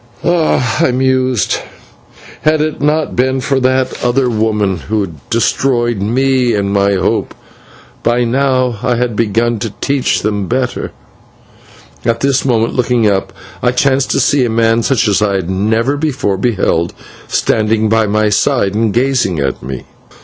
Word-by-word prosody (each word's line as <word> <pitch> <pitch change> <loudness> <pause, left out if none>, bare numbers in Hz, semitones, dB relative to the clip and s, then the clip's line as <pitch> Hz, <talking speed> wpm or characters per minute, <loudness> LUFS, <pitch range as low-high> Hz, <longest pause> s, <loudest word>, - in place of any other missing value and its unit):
"Ah!" 160 -9 +1
I - - +3
mused, 130 -4 +1 0.8
"had 155 0 +2
it 155 0 -2
not 150 +2 0
been 130 +1 +1
for 135 0 0
that 130 0 0
other 125 +1 +1
woman 105 -3 0
who 100 +1 -3 0.2
destroyed 120 -1 +1
me 125 +2 +1
and 100 -1 -1
my 100 0 +2
hope, 95 - -1 0.7
by 120 +1 +1
now 130 -1 0
I 125 0 +1
had 120 -2 -1
begun 115 +1 0
to 110 -3 -5
teach 140 -2 0
them 105 -2 -1
better." 130 0 -2 1.1
At 115 0 0
this 135 -1 +1
moment, 115 -3 +1
looking 125 -2 +1
up, 100 -2 0 0.3
I 125 0 +1
chanced 135 +1 +1
to - - +1
see 135 0 +2
a 120 - 0
man 115 0 +2
such 115 0 +1
as 105 0 +2
I 100 -2 +1
had 95 -1 -2
never 110 +8 0
before 140 -9 -1
beheld, 95 -7 0 0.3
standing 110 0 +1
by 110 0 +2
my 105 +1 +1
side 105 -1 +1
and 110 0 +1
gazing 120 -6 +1
at 70 -3 -2
me. 65 -1 -7
120 Hz, 155 wpm, -14 LUFS, 105-130 Hz, 1.1 s, I